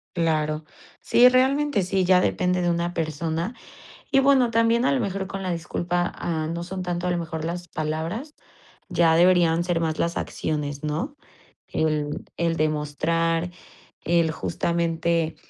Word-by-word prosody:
Claro. 155 -2 0 0.3
Sí, 245 +1 +6
realmente 265 -2 +2
sí, 185 +1 0
ya 180 0 +5
depende 180 0 +1
de 175 - +1
una 170 0 -1
persona 165 - -2 0.6
y 270 - +5
bueno, 270 -3 +4
también 230 +2 +3
a - - +3
lo 275 - +2
mejor 195 -3 -2
con 195 0 -6
la 185 - -2
disculpa, 175 +1 -2
ah, 160 -2 -2
no 170 +2 -4
son 185 +1 -5
tanto 175 0 -3
a 180 - +1
lo 175 - 0
mejor 160 -1 -4
las 175 +1 -4
palabras, 160 - -4 0.6
ya 170 -3 +3
deberían 170 -1 +4
ser 175 -1 0
más 160 -1 -1
las 170 0 0
acciones, 145 -2 -3
¿no?, 160 - -3 0.5
el 150 -2 -1
el 170 -1 +1
demostrar, 165 +3 0 0.5
el 170 -1 +2
justamente 165 0 -1
170 Hz, 150 wpm, -24 LUFS, 160-185 Hz, 0.6 s, Sí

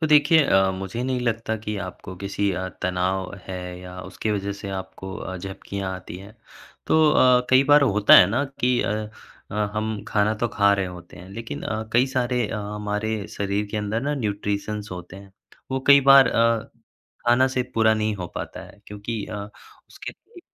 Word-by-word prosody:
तो 160 - +1
देखिए 150 +1 +5
अ, 95 -6 +3
मुझे 95 +5 -5
नहीं 130 -1 -1
लगता 115 -2 -1
कि 105 -1 -3
आपको 90 0 -9
किसी 100 +1 -1
अ, 95 0 -3
तनाव 90 +1 -1
है 90 -1 -6
या 90 0 -10
उसकी 95 +3 -4
वजह 100 -1 -2
से 100 - -6
आपको 95 0 -9
अ, 95 -3 -6
झपकियाँ 95 +1 -5
आती 95 -1 -9
हैं। 100 +4 -13 0.5
तो 155 -1 +4
अ, 125 -3 +4
कई 130 +1 +6
बार 145 +1 +6
होता 105 -6 +5
है 90 - +8
ना 120 +6 +1 0.2
कि 125 0 +2
अ, - - -1 0.6
अ, - - -7 0.2
हम 110 -1 -2
खाना 105 +1 +2
तो 115 +2 -1
खा 100 -1 +3
रहे 100 -1 -1
होते 90 -1 -11
हैं, 90 +1 -12
लेकिन 115 +3 -7
अ, 110 0 -3
कई 125 +3 +4
सारे 125 -2 0
अ, - - -4
हमारे 105 0 -3
शरीर 100 +1 -1
के 110 - -3
अंदर 105 +1 -1
ना 145 +2 -1
न्यूट्रिशंस 105 -3 -3
होते 90 0 -9
हैं। 100 0 -14 0.4
वो 130 0 -1
कई 140 0 +8
बार 135 -1 +8
अ, 115 -1 +1 0.6
खाना 125 +2 +5
से 130 -1 -1
पूरा 110 -1 +4
नहीं 110 0 -1
हो 90 -2 -5
पाता - - -6
है, 100 - -17
क्योंकि 105 +1 -5
अ, - - -7 0.5
उसके - - -8
लिए 375 -6 -18
105 Hz, 195 wpm, -23 LUFS, 95-120 Hz, 0.6 s, है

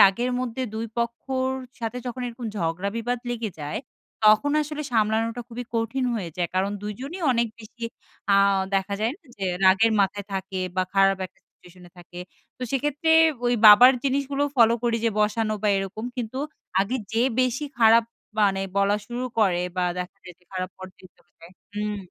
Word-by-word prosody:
রাগের 235 +6 +5
মধ্যে 255 +1 -3
২ 225 +1 -3
পক্ষর 260 +3 -1 0.3
সাথে 230 +2 -3
যখন 245 +1 -5
এরকম 240 0 -6
ঝগড়া 170 +2 -1
বিবাদ 245 +2 -1
লেগে 230 -3 -3
যায়। 150 +9 -3 0.5
তখন 215 +7 +5
আসলে 300 0 -5
সামলানোটা 225 +2 +1
খুবই 245 +1 -6
কঠিন 230 +3 -1
হয়ে 185 -7 -4
যায়। 175 -2 -1
কারণ 190 +2 +1
দুজনই 260 - -6
অনেক 235 -1 +1
বেশি 220 +2 -14 0.5
আ - - +6 0.4
দেখা 195 +1 0
যায় 225 +2 +1
না, 340 -7 -31
যে 195 - -4 0.2
রাগের 200 +4 +5
মাথায় 200 0 0
থাকে 190 0 -3 0.2
বা 185 - +3
খারাপ 195 0 +4
একটা 190 +1 -32
সিচুয়েশন 180 0 -19
এ - - -27
থাকে। 175 0 -10 0.4
তো - - -7
সেক্ষেত্রে 295 +4 0 0.4
ওই 245 - +3
বাবার 245 +5 +10
জিনিসগুলো 275 +1 0
ফলো 230 -1 +6
করি 235 -1 +1
যে, 230 - +3
বসানো 215 +1 +1
বা 210 - +2
এরকম। 195 +4 -5
কিন্তু 245 +2 -4 0.4
আগে 215 +7 0 0.2
যে 230 +1 +2 0.2
বেশি 255 +4 0
খারাপ 225 0 +6 0.4
মানে 195 -1 +1
বলা 200 +1 +3
শুরু 245 +1 -4
করে, 180 -4 +3
বা 180 - +1
দেখা 180 +2 -5
যায় 180 -1 -11
যে 180 - -31
খারাপ 185 0 -3
পর্যায় 185 0 -12
চলে - - -31
যায় 170 +2 -14 0.2
হুম, 210 0 -2
220 Hz, 175 wpm, -25 LUFS, 195-245 Hz, 0.5 s, বাবার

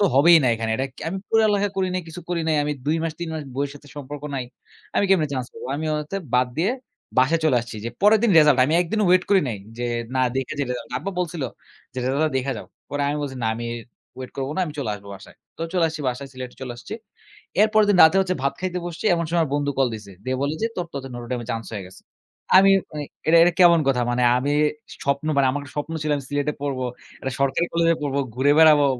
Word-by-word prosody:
তো 205 - +4
হবেই 165 +4 +7
না - - +2
এখানে। 115 0 -3
"এটা 135 - -1 0.2
আমি 190 +3 -3
পড়ালেখা 210 -2 +3
করি 190 -1 +1
নাই, 185 - 0
কিছু 170 +2 -8
করি 175 -1 -1
নাই। 155 -1 +2
আমি 150 - -1
২ 155 +2 +2
মাস, 165 -1 -2
৩ 170 - -3
মাস 155 - -4
বইয়ের 140 +1 -1
সাথে 145 0 -14
সম্পর্ক 145 +1 -7
নাই। 130 - -2 0.5
আমি - - +3
কেমনে 170 -6 +3
চান্স 130 -2 -2
পাব?" - - -11
আমি 160 - -4
অ - - +1 0.2
তে 195 - -2 0.2
বাদ 125 0 +4
দিয়ে 185 +8 +2 0.5
বাসায় 160 +6 +3
চলে 145 -6 +4
আসছি 120 -1 -8
যে, - - -1
পরের 210 +2 +6
দিন 235 - +3
রেসাল্ট 150 -3 +6
আমি 155 +5 +1
১ 175 - 0
দিনও 215 -2 +2
ওয়েট 180 0 +4
করি 195 -2 +6
নাই 110 - -4 0.2
যে, 120 - -2 0.3
"না, 130 - +2 0.2
দেখে 135 +3 -2
যাই 140 - 0
রিসাল্ট।" 120 -2 -5
আব্বা 195 - -4
বলছিল 170 -4 -3 0.5
যে, - - -22
"রেজাল্টটা 145 +4 +1
দেইখা 135 +1 -1
যাও।" - - -9 0.2
পরে 145 0 -1
আমি 145 - -1
বলছি, 135 -2 -5
"না, - - +1
আমি 120 +1 -5 0.5
ওয়েট 130 - -7
করব 135 -1 -2
না - - +1
আমি 150 - -6
চলে 125 -7 -2
আসব 100 0 -12
বাসায়।" 95 +1 -14 0.2
তো - - -15
চলে 180 -3 +2
আসছি 155 -1 -6
বাসায়, 130 +2 -4
সিলেটে 130 -1 -8
চলে 125 - -5
আসছি। 120 - -8 0.7
এর 215 - +6
পরের 215 -1 +5
দিন 195 - +4
রাতে 160 +4 +5
হচ্ছে 185 -1 0
ভাত 140 - +1
খাইতে 185 -1 -2
বসছি, 175 +4 -7
এমন 170 -1 -1
সময় 170 +1 +1
আমার 155 - -2
বন্ধু 145 0 0
কল 135 -2 +3
দিছে, 105 -2 -9
দিয়ে 130 0 -1
বলে 145 +2 0
যে, - - +3
"তোর 180 - -2
টা - - -6
তো - - -6
নটরডেমে 120 -1 -5
চান্স 115 0 -5
হয়ে 100 -3 -5
গেছে।" 95 - -16 0.6
আমি 195 +1 +6 0.2
মানে 150 -1 -4 0.2
এটা, 165 - +6
এটা 175 - +3
কেমন 170 -2 +7
কথা? 125 -2 +2
মানে 125 +1 0 0.2
আমি 140 +3 -1 0.5
স্বপ্ন 140 +2 0
মানে, 140 -1 +4
আমার 145 +2 -3
একটা 140 - -12
স্বপ্ন 145 +2 -3
ছিল 150 - -1
আমি 140 - -6
সিলেটে 145 +1 0
পড়ব, 140 -2 -2 0.4
একটা 135 - -3
সরকারি 140 +5 +1
কলেজে 165 0 +3
পড়ব, 140 -2 -2 0.2
ঘুরে 140 +3 +4
বেড়াবো। 155 -3 +7
145 Hz, 250 wpm, -23 LUFS, 130-170 Hz, 0.7 s, হবেই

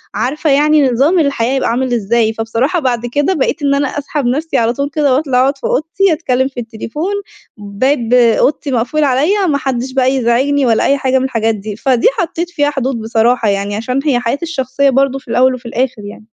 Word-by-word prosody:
عارفة 300 +5 -1
يعني 295 0 +3
نظام 285 +10 +2
الحياة 270 -4 0
يبقى 265 - 0
عامل 250 +1 -1
إزاي، 225 0 +1
فبصراحة 230 +9 -1
بعد 245 -5 -1
كده 290 +9 0
بقيت 315 0 -1
إن 280 0 +2
أنا 285 0 0
أسحب 290 0 -4
نفْسي 300 +6 -1
على 230 0 +1
طول 280 +3 -3
كده 285 -3 +1
وأطلع 270 -3 +1
أقعد 275 +2 +1
في - - -28
أوضتي 335 +5 +1
اتكلّم 260 -5 0
في 260 -2 -8
التليفون، 240 - -5 0.4
باب 230 +4 -1
أوضتي 250 +4 +2
مقفول 255 +6 0
عليّا 305 +9 +1
ما 290 -4 +1
حدّش 260 -1 -3
بقى 260 -1 +2
يزعجني 265 +3 +1
ولا 225 -2 +2
أي 280 - +2
حاجة 265 -1 +1
من 260 - -1
الحاجات 225 -3 0
دي، 210 0 -7
فدي 250 +1 +1
حطّيت 345 0 -2
فيها 290 -4 0
حدود 265 -4 -3
بصراحة 225 0 +1
يعني 200 +1 -2
عشان 250 +5 -2
هي 265 -5 +2
حياتي 245 +6 -2
الشخصية 275 -3 0
برضه 270 0 +1
في - - -31
الأول 255 +2 +3
وفي 250 0 -13
الآخر 240 -1 -2
يعني. 210 - -13
260 Hz, 200 wpm, -14 LUFS, 235-285 Hz, 0.4 s, يعني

